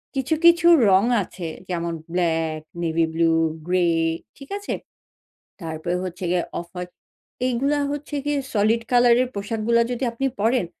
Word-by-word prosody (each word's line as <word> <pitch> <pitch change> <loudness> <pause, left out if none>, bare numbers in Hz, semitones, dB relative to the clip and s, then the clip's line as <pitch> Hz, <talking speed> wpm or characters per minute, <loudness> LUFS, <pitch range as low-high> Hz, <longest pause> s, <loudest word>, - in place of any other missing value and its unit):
কিছু, 270 +4 0
কিছু 340 0 +6 0.2
রং 190 +1 +5 0.2
আছে। 175 -1 -7 0.2
যেমন 170 -1 -2 0.2
ব্লাক, 165 -3 0 0.2
নেভি 165 0 +1
ব্লু, 165 0 +3 0.3
গ্রে 180 -1 +2 0.5
ঠিক 275 - -12
আছে? 405 - -4 0.9
তারপরে 165 +2 -3
হচ্ছে 180 +1 -6
গিয়ে 180 -1 +2 0.2
অফ-হোয়াইট 180 +1 -8 0.6
এইগুলা 270 +4 +1
হচ্ছে 290 +1 -4
গিয়ে 290 0 0
সলিড 220 +2 +2
কালার 245 -1 +5
এর 255 - -2
পোশাকগুলা 220 +3 +1
যদি 250 +1 -2
আপনি 270 +4 -2
পড়েন, 225 -3 +2
205 Hz, 140 wpm, -23 LUFS, 170-255 Hz, 0.9 s, কিছু